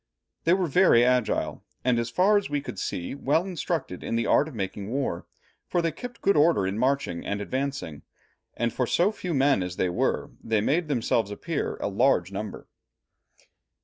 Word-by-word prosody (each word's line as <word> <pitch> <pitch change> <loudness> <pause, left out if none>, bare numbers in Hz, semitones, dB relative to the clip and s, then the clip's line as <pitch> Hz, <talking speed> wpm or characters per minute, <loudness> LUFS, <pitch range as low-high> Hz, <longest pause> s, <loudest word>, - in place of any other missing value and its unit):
They 165 - +5
were 185 -1 +2
very 155 -7 +5
agile, 125 -2 0 0.2
and 125 -2 +3
as 115 0 -2
far 190 - +3
as 205 -5 +1
we 145 0 0
could 120 -8 -7
see, 85 - -3
well 145 +5 +1
instructed 170 - -3
in - - -2
the 115 0 +1
art 150 - +3
of 155 - -9
making 100 0 -4
war, 130 -9 -2 0.4
for 175 - 0
they 165 -1 +1
kept 245 +4 -9
good 200 - +4
order 150 - +4
in 95 +3 -2
marching 130 -9 0
and 100 - -2
advancing, 130 - -3 0.6
and 120 0 0
for 125 - 0
so 180 - +3
few 180 -6 -4
men 135 -5 +3
as 90 -1 -4
they 90 - 0
were, 90 - -1
they 110 -1 +1
made 155 +10 +1
themselves 115 -6 +1
appear 155 +10 -3
a - - -3
large 100 -4 +2
number." 100 +1 -6
130 Hz, 185 wpm, -26 LUFS, 105-160 Hz, 0.6 s, They